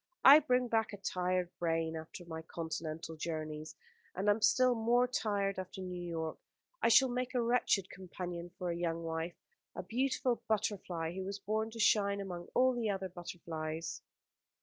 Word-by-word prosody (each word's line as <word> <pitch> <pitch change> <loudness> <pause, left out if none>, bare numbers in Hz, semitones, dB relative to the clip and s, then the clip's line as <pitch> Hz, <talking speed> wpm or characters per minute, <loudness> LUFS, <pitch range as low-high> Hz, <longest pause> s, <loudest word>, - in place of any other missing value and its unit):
I 280 +3 +12
bring 250 -4 +2
back 225 -2 +1
a - - -5
tired 180 -2 -1
brain 165 -1 0
after 160 +2 -8
my 160 -1 -6
continental 160 0 -5
journeys, 155 -1 -4 0.4
and 205 - +1
am 205 +2 +3
still 255 +4 +5
more 240 +2 +3
tired 200 -5 0
after 185 +1 -7
New 180 -1 -5
York. 165 -2 -4 0.4
I - - +4
should 255 +3 +6
make 250 +1 -2
a 245 - +3
wretched 230 -5 +2
companion 175 -2 -6
for 180 -1 -2
a - - -2
young 170 -1 -2
wife, 165 +1 -3 0.4
a - - -4
beautiful 255 0 0
butterfly 190 -6 -1
who 190 +1 -4
was 195 +1 -4
born 215 +2 -1
to 230 +1 -9
shine 200 -2 +3
among 180 -3 -5
all 255 +1 +5
the 235 -3 -1
other 190 -1 -2
butterflies." 165 -2 -5
185 Hz, 170 wpm, -34 LUFS, 170-225 Hz, 0.4 s, I